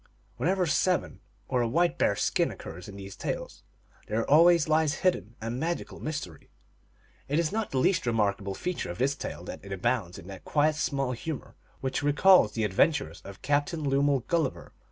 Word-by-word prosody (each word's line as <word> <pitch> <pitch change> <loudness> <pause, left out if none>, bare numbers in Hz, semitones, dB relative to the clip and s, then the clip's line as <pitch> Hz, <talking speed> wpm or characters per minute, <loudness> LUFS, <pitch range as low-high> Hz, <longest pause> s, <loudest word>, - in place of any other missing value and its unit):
Whenever 185 +1 +1
seven 180 +2 +1 0.3
or 125 -2 +1
a 120 - +1
white 170 +8 +1
bear - - +3
s 100 - -2
skin - - +2
occurs 85 +2 -9
in 100 - -9
these 100 0 -9
tales, - - -5 0.5
there 110 +2 -1
always 170 +2 +6
lies 155 -1 +2
hidden 145 - +1
a 115 +1 -4
magical 160 +8 -3
mys 155 -1 -3
tery. 80 -5 -16 0.8
It 145 +3 0
is 170 0 +1
not. 220 0 -2
the 135 - -2
least 150 +1 +2
remarkable 100 -3 0
feature 180 - -3
of 85 - -5
this 135 +2 +2
tale 140 - -6
that - - -8
it 100 - -10
abounds 95 -2 -1
in - - -11
that 95 -1 -9
quiet 150 +1 +2
small 140 -3 -1
humor 140 +4 -6 0.3
which 130 0 -1
re 145 0 +2
calls 180 - +6
the 110 - -1
adventures 135 - +1
of 100 0 -11
Captain 145 +2 0
Lemuel 140 0 +2
Gulliver. 160 0 -2
140 Hz, 190 wpm, -28 LUFS, 105-160 Hz, 0.8 s, always